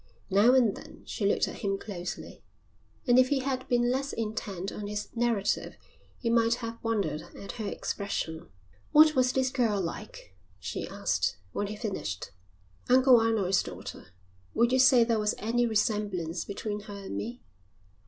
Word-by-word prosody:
Now 215 Hz, +7 st, +6 dB
and 235 Hz, -6 st, +4 dB
then -, -, -12 dB
she 200 Hz, -, -1 dB
looked -, -, +2 dB
at -, -, -7 dB
him 195 Hz, -1 st, -1 dB
closely, 180 Hz, -4 st, -7 dB, 0.6 s
and 245 Hz, -1 st, +5 dB
if 255 Hz, 0 st, +5 dB
he 280 Hz, -2 st, +1 dB
had 260 Hz, -1 st, -2 dB
been 240 Hz, 0 st, +2 dB
less 270 Hz, +2 st, -1 dB
intent 205 Hz, -4 st, -4 dB
on 205 Hz, -, -6 dB
his 210 Hz, 0 st, -4 dB
narrative 230 Hz, -4 st, 0 dB, 0.4 s
he 235 Hz, -, -4 dB
might 230 Hz, 0 st, +3 dB
have 230 Hz, -1 st, -7 dB
wondered 200 Hz, -10 st, -1 dB
at 200 Hz, -, -7 dB
her 210 Hz, -, -3 dB
expression. 170 Hz, -7 st, -4 dB, 0.4 s
"What 310 Hz, +1 st, +8 dB
was 255 Hz, -2 st, +3 dB
this 260 Hz, -1 st, +1 dB
girl 230 Hz, -6 st, +1 dB
like?" 165 Hz, -, -6 dB, 0.2 s
she -, -, -4 dB
asked -, -, -1 dB
when 205 Hz, -, -2 dB
he 210 Hz, -, -5 dB
finished. 190 Hz, -, -4 dB, 0.6 s
"Uncle 255 Hz, -1 st, +7 dB
Arnold's 210 Hz, -5 st, +2 dB
daughter. -, -, -8 dB, 0.5 s
Would 235 Hz, +1 st, +3 dB
you 260 Hz, -, +3 dB
say 255 Hz, -2 st, +7 dB
there 230 Hz, -1 st, +1 dB
was 210 Hz, 0 st, +1 dB
any 240 Hz, +2 st, +1 dB
resemblance 205 Hz, -6 st, -1 dB
between 205 Hz, +1 st, -4 dB
her 205 Hz, -1 st, -9 dB
and 195 Hz, -1 st, -7 dB
me?" 240 Hz, +3 st, -5 dB
220 Hz, 165 wpm, -29 LUFS, 200-245 Hz, 0.6 s, What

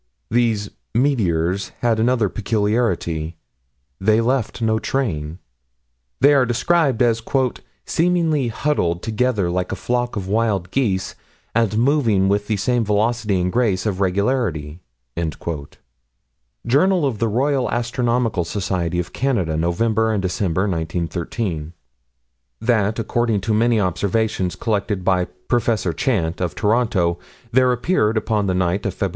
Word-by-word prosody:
These 115 Hz, -3 st, +1 dB, 0.2 s
"meteors" 100 Hz, -, +1 dB
had 115 Hz, -2 st, +2 dB
another 115 Hz, -1 st, +2 dB
peculiarity; 105 Hz, -7 st, -1 dB, 0.6 s
they 110 Hz, +3 st, +3 dB
left 125 Hz, 0 st, 0 dB
no 110 Hz, -1 st, +1 dB
train. 85 Hz, -, -2 dB, 0.8 s
They 145 Hz, +2 st, +6 dB
are 135 Hz, -2 st, +5 dB
described 130 Hz, +1 st, +2 dB
as 115 Hz, -1 st, +2 dB, 0.6 s
"seemingly 165 Hz, -5 st, +1 dB
huddled 105 Hz, -, -1 dB
together 110 Hz, -5 st, 0 dB
like 90 Hz, 0 st, -2 dB
a -, -, -1 dB
flock 120 Hz, +3 st, -1 dB
of 95 Hz, -3 st, -4 dB
wild 100 Hz, -4 st, 0 dB
geese, 100 Hz, -8 st, 0 dB, 0.4 s
and 110 Hz, -2 st, +1 dB
moving 115 Hz, -7 st, +3 dB
with 105 Hz, +1 st, 0 dB
the 110 Hz, -, 0 dB
same 120 Hz, +3 st, +1 dB
velocity 105 Hz, -1 st, +1 dB
and 90 Hz, +1 st, 0 dB
grace 110 Hz, -5 st, +1 dB
of 100 Hz, -3 st, -1 dB
regularity." 95 Hz, -, 0 dB, 1.9 s
Jour. 140 Hz, +9 st, +4 dB
Roy. 135 Hz, -, +1 dB
Astro. 120 Hz, 0 st, 0 dB, 0.2 s
Soc. 90 Hz, -1 st, -2 dB
of 85 Hz, -1 st, -3 dB
Canada, 115 Hz, -, 0 dB
November 110 Hz, +7 st, +1 dB
and 100 Hz, -, 0 dB
December, 95 Hz, -1 st, 0 dB
1913: 85 Hz, -1 st, -3 dB, 0.9 s
That, 110 Hz, -2 st, +1 dB
according 115 Hz, -2 st, 0 dB
to 110 Hz, +3 st, -1 dB
many 115 Hz, +1 st, +3 dB
observations 95 Hz, 0 st, 0 dB
collected 105 Hz, -2 st, -1 dB
by 90 Hz, -2 st, +2 dB, 0.2 s
Prof. 115 Hz, -7 st, +1 dB
Chant, 95 Hz, -, 0 dB
of 90 Hz, -3 st, -2 dB
Toronto, 105 Hz, -7 st, +1 dB, 0.3 s
there 130 Hz, +1 st, +4 dB
appeared, 120 Hz, -4 st, +1 dB
upon 105 Hz, -2 st, 0 dB
the 95 Hz, -, 0 dB
night 90 Hz, +1 st, 0 dB
of -, -, -4 dB
Feb. -, -, -1 dB
110 Hz, 125 wpm, -21 LUFS, 95-120 Hz, 1.9 s, They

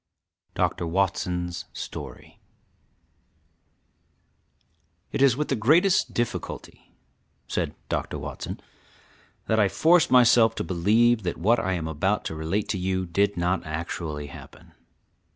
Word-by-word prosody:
[DR. 85 Hz, -, 0 dB
WATSON'S 90 Hz, -1 st, -1 dB
STORY.] -, -, -8 dB, 2.7 s
It -, -, -2 dB
is 135 Hz, -3 st, +5 dB
with 150 Hz, -, -2 dB
the 135 Hz, -, +1 dB
greatest 165 Hz, -, +3 dB
difficulty, 120 Hz, -1 st, -4 dB, 0.6 s
(said -, -, -2 dB
Dr. -, -, -3 dB
Watson), -, -, -6 dB, 0.9 s
that 110 Hz, -, +1 dB
I 100 Hz, -2 st, +4 dB
force 160 Hz, -, +4 dB
myself 120 Hz, -3 st, +5 dB
to -, -, -2 dB
believe 110 Hz, +7 st, +3 dB
that 90 Hz, -3 st, -3 dB
what 110 Hz, +7 st, +3 dB
I 95 Hz, -, -1 dB
am 85 Hz, -3 st, -3 dB
about 90 Hz, +7 st, -1 dB
to 80 Hz, -, -4 dB
relate 80 Hz, +7 st, -2 dB
to 95 Hz, -, -1 dB
you 95 Hz, 0 st, -1 dB
did 100 Hz, +3 st, 0 dB
not 90 Hz, +2 st, 0 dB
actually 80 Hz, -1 st, -5 dB
happen. 70 Hz, -, -13 dB
95 Hz, 120 wpm, -25 LUFS, 85-115 Hz, 2.7 s, is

